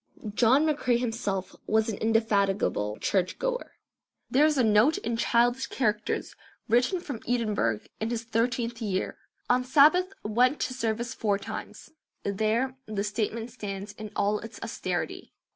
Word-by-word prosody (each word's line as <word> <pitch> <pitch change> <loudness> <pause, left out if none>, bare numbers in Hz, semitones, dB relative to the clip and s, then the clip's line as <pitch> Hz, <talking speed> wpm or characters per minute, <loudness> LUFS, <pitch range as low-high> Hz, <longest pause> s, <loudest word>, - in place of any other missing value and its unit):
John 255 +7 +4
McCrae 285 -6 +2
himself 225 -6 -2
was 220 0 +2
an 220 -3 -3
indefatigable 200 - +1
church 185 -2 0
goer. - - -3 0.6
There 295 +4 +5
is 305 -2 +1
a 255 - +4
note 220 +8 +4
in 230 0 -2
childish 240 +2 +2
characters 220 -4 -1 0.3
written 245 - +3
from 280 -9 -6
Edinburgh 210 - +1 0.2
in 220 - -1
his 230 -1 -2
thirteenth 230 +1 -1
year, 195 -4 -2 0.3
"On 250 +1 +3
Sabbath 310 +8 +5
went 245 +6 +2
to 255 - -1
service 230 -1 -2
four 205 -3 0
times." 195 - -8 0.3
There 220 +6 0
the 210 -2 -2
statement 220 +2 -2
stands 205 -3 -6
in 215 +1 -8
all 210 +1 +1
its 225 +1 -9
austerity. - - -4
230 Hz, 145 wpm, -28 LUFS, 210-250 Hz, 0.6 s, There